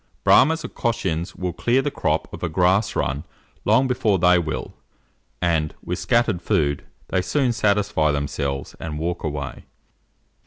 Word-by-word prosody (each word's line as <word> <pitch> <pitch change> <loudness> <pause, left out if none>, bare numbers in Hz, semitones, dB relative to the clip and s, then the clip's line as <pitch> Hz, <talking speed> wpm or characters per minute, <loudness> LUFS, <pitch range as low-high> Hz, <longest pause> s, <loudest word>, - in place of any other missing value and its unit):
Brahmas 160 +3 +5
or - - -5
Cochins 95 -9 -2
will 90 -1 -3
clear 120 +9 +1
the 145 - -1
crop - - -1
of - - -8
a 85 - -1
grass 95 +5 +2
run 70 +3 -1 0.4
long 130 0 +4
before 120 -6 +1
they 90 0 +5
will, 70 -6 -4 0.7
and, 80 -3 +1
with 90 - -3
scattered 115 -7 +1
food, 75 -9 0 0.3
they 95 - +1
soon 130 +5 +1
satisfy 100 -8 +2
themselves 70 -1 -3
and 75 -2 -5
walk 85 +3 -3
away. 70 -3 -4
90 Hz, 150 wpm, -23 LUFS, 75-110 Hz, 0.7 s, Brahmas